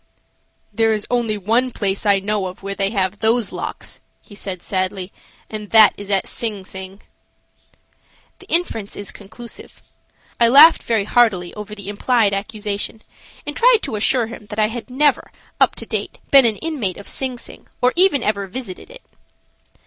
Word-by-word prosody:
"There 225 -1 +2
is 210 -1 -3
only 235 -3 0
one 230 +6 +1
place 200 -3 -2
I 200 -1 +5
know 200 -1 -2
of 185 +1 -10
where 195 0 -3
they 195 0 0
have 200 -1 -1
those 225 0 +2
locks," - - -6 0.2
he - - -16
said, 190 -3 -6
sadly, 185 0 -2 0.3
"and 210 -2 -7
that 220 -1 +7
is 205 0 -10
at 195 -1 +1
Sing 210 -5 -3
Sing." 190 +1 -9 1.4
The - - -16
inference 230 - 0
is 205 -1 -5
conclusive. 225 +4 -11 0.6
I 235 - +5
laughed 295 +7 +8
very 225 -3 0
heartily 200 -6 +2
over 210 0 -8
the 200 -2 -9
implied 210 0 +1
accusation, 205 +1 -4 0.4
and 295 0 -5
tried 480 -2 +4
to 270 - -3
assure 235 +3 +2
him 225 -2 -10
that 210 - -7
I 215 -1 +2
had 240 +2 -7
never, 285 +2 +1 0.3
up - - +4
to - - -6
date, - - -3
been 275 -2 +8
an 220 - +2
inmate 270 - -3
of 200 - -11
Sing 260 -2 -2
Sing - - -10
or 250 +1 +2
even 350 -8 +4
ever 200 -2 -1
visited 205 - -7
it. - - -13
215 Hz, 170 wpm, -20 LUFS, 200-245 Hz, 1.4 s, laughed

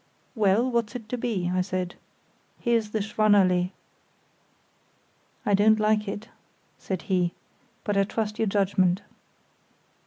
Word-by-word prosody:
"Well, 215 +1 +3
what's 235 -2 -1
it 225 -3 -6
to 250 - -2
be?" 195 -7 -1
I 185 - +2
said. 180 -1 -3 0.7
"Here's 230 -3 +1
the 215 -1 -1
Schwannallée." 200 -4 +3 1.8
"I 205 - +2
don't 215 +2 +5
like 215 0 +2
it," 205 +3 -5 0.5
said 185 -4 -4
he; 180 -3 +1 0.5
"but 205 - -1
I 200 - +4
trust 210 +1 -3
your 225 - +2
judgement." 195 -1 +2
205 Hz, 125 wpm, -26 LUFS, 185-220 Hz, 1.8 s, don't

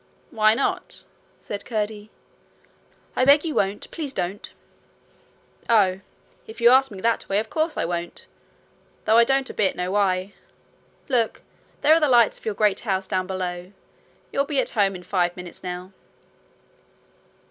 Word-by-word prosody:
'Why 215 -1 +4
not?' 275 - -2 0.3
said 205 -1 -7
Curdie. 215 -2 -4 1.1
'I - - +2
beg 285 +3 +6
you 315 - -2
won't. 200 -3 -1
Please 295 -5 -5
don't.' 190 +1 -4 1.2
'Oh! 195 -5 +4 0.5
if 220 - -11
you 235 +1 +6
ask 265 +1 +5
me 200 -4 -9
that 230 +2 0
way, 195 - +1
of 215 - -2
course, 315 0 -1
I - - 0
won't; 170 0 -5 0.8
though 220 +1 +4
I - - +8
don't 270 +2 0
a - - -13
bit 195 -3 +1
know 180 +1 -3
why. 195 -1 0 0.7
Look! 240 -5 0 0.4
there 310 - +6
are 325 - +5
the 300 -3 +2
lights 235 -4 +4
of - - -21
your 215 -2 -2
great 210 -1 +2
house 190 -4 -2
down 185 -1 -2
below. 180 0 -5 0.6
You'll 275 - +1
be 285 -2 -1
at - - 0
home 200 -3 +1
in 180 - -9
five 175 -1 0
minutes 180 -1 -10
now.' 180 0 -6
205 Hz, 160 wpm, -23 LUFS, 185-245 Hz, 1.2 s, I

